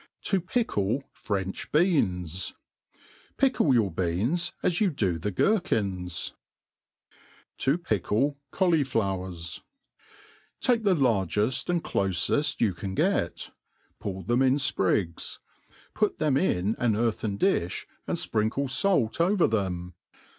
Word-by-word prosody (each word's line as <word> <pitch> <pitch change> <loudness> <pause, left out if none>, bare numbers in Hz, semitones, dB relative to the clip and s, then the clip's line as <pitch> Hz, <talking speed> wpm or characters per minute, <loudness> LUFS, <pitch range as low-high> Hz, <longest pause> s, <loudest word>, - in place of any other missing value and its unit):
To 195 -2 +1
pickle 140 - 0
French 95 -2 -4
BeOnt. 95 - +1 0.8
FICKLE 260 - +3
your 105 -5 +2
beans 95 - 0
as 175 +4 +1
you 205 - +4
do 95 - -1
the 105 +5 -2
gerkihs^ 100 - 0 1.3
To 135 +4 +2
pickle 135 - 0
Caulijkwerf. 100 - 0
^ - - -30 1.0
TAKE 245 -3 +2
the 200 -4 +3
largeft 110 - +1
and 175 -2 +1
clofeft 100 +10 0
you 110 -5 +3
can 95 +2 -5
get; - - 0 0.5
pull 95 -1 -5
them 120 +8 +1
in 130 0 +4
fprigs; 95 - 0 0.6
put 210 -1 0
them 150 -4 +1
in 110 - +1
an 115 -4 +2
earthen 110 -2 -1
dift), 95 - 0 0.2
and - - -1
fprinkle 110 +6 0 0.2
(alt 165 - +2
over 185 +1 +3
them. 90 -5 -1
115 Hz, 115 wpm, -27 LUFS, -, 1.3 s, you